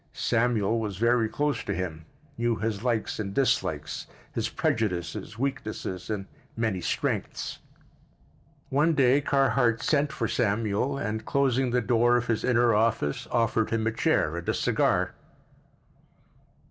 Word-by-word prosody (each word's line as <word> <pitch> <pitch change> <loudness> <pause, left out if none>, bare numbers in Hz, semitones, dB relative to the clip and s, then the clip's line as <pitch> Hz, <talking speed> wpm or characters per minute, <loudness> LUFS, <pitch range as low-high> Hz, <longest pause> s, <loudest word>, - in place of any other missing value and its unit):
Samuel 115 -2 +1
was 105 -4 -4
very 115 0 +2
close 145 -2 -1
to 100 - -2
him, 80 -4 -4 0.3
knew 120 -2 +1
his 105 -1 -2
likes 115 -4 -1
and 100 -2 -4
dislikes, 80 - 0 0.3
his - - -1
prejudices, 90 -1 -2
weaknesses 110 -8 -4
and 105 -3 -2 0.3
many 110 -5 0
strengths. - - -2 1.1
One 150 +4 +2
day 135 0 +4
Carhart 125 -4 +2
sent 150 -1 +2
for - - -2
Samuel 115 +3 0
and, 110 -5 -3
closing 135 -2 +1
the 125 +1 +1
door 120 +1 +3
of 120 - -1
his 115 -3 -1
inner 120 -2 +3
office, 105 -9 +1
offered 115 -2 +1
him 115 -1 0
a 110 - +2
chair 85 -7 +1
and 85 0 -4
a - - +1
cigar. - - +1
115 Hz, 135 wpm, -27 LUFS, 105-125 Hz, 1.1 s, day